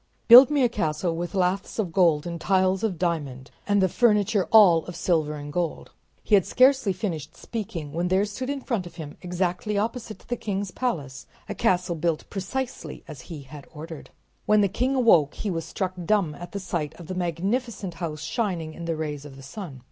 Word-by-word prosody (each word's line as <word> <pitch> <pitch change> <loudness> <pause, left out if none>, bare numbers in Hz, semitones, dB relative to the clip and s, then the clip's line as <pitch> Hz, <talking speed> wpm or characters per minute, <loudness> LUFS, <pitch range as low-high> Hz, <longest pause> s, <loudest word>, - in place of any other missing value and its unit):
"Build 250 +3 +11
me 290 -3 +2
a - - +5
castle 165 -5 -1
with 175 +3 -4
laths 185 +1 0
of 200 -7 -1
gold 165 -5 +3
and 170 -1 -5
tiles 190 0 +2
of 205 -6 0
diamond 145 -7 -3 0.2
and 205 -1 +3
the - - +5
furniture 210 -1 +2
all 185 -7 +7
of 175 - -7
silver 160 -3 0
and 145 0 -8
gold." 175 -1 -3 0.3
He - - -3
had 195 -3 +7
scarcely 260 -3 +4
finished 180 -5 -4
speaking 170 -10 -6
when 170 +2 -1
there 190 +3 +2
stood 255 +6 -5
in 280 -1 -3
front 225 -9 -2
of 170 - -14
him, 155 -4 -8
exactly 180 +3 -2
opposite 225 +1 -3
the 245 - -1
king's 200 -4 -3
palace, 150 - -3 0.2
a - - -3
castle 180 -1 +1
built 165 -1 -1
precisely 240 +7 -5
as 150 -5 -9
he 155 -5 -7
had 140 +1 -12
ordered. 160 0 -9 0.4
When 210 0 +5
the 200 - +4
king 250 +7 0
awoke 175 - +4
he 205 - -3
was 165 -2 -3
struck 185 +2 -3
dumb 175 -4 +1
at 175 +3 -9
the 200 - -4
sight 170 -5 -3
of 170 - -11
the 185 - -5
magnificent 190 +4 -2
house 155 -3 -4
shining 170 -5 -2
in 170 - -8
the 165 -1 -1
rays 150 -2 -4
of 145 -2 -11
the 135 - -12
sun. 150 - -8
180 Hz, 200 wpm, -25 LUFS, 160-210 Hz, 0.4 s, Build